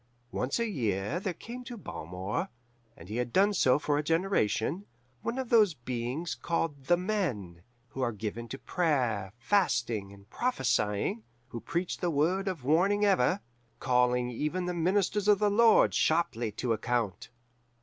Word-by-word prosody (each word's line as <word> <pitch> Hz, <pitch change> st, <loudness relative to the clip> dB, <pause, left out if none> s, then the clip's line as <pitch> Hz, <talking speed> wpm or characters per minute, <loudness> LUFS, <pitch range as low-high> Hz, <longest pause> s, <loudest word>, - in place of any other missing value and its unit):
"Once 125 Hz, +3 st, -1 dB
a 235 Hz, -, 0 dB
year 115 Hz, -, -1 dB
there 190 Hz, 0 st, -2 dB
came 245 Hz, +2 st, -8 dB
to 245 Hz, -1 st, -8 dB
Balmore 90 Hz, -, -4 dB, 0.5 s
and 85 Hz, -, -12 dB
he 110 Hz, +4 st, -4 dB
had 125 Hz, -1 st, -2 dB
done 200 Hz, -, +4 dB
so 130 Hz, -8 st, +4 dB
for 145 Hz, 0 st, 0 dB
a -, -, -1 dB
generation 165 Hz, -, 0 dB, 0.3 s
one 235 Hz, +2 st, -3 dB
of 260 Hz, -3 st, -3 dB
those 210 Hz, -8 st, +5 dB
beings 125 Hz, +6 st, -3 dB
called 160 Hz, -5 st, -2 dB
The 175 Hz, +5 st, +4 dB
Men, 145 Hz, -, -2 dB, 0.3 s
who 135 Hz, -, -6 dB
are 120 Hz, -2 st, +1 dB
given 110 Hz, +2 st, -5 dB
to 135 Hz, -, -6 dB
prayer, 125 Hz, -, 0 dB
fasting, 120 Hz, -, 0 dB
and 100 Hz, 0 st, -16 dB
prophesying, 120 Hz, -, 0 dB, 0.3 s
who 120 Hz, -, -6 dB
preach 175 Hz, +1 st, -3 dB
the 175 Hz, -, 0 dB
word 170 Hz, +6 st, +1 dB
of 180 Hz, -8 st, -3 dB
warning 190 Hz, +9 st, +3 dB
ever, 195 Hz, -1 st, +3 dB, 0.4 s
calling 125 Hz, -1 st, +2 dB
even 150 Hz, +9 st, -2 dB
the 180 Hz, -, -2 dB
ministers 190 Hz, +4 st, +1 dB
of 210 Hz, -1 st, +6 dB
the 205 Hz, +1 st, +2 dB
Lord 225 Hz, +1 st, +5 dB
sharply 155 Hz, -9 st, +1 dB
to 115 Hz, +2 st, -1 dB
account. 115 Hz, -3 st, -2 dB
150 Hz, 160 wpm, -30 LUFS, 115-190 Hz, 0.5 s, of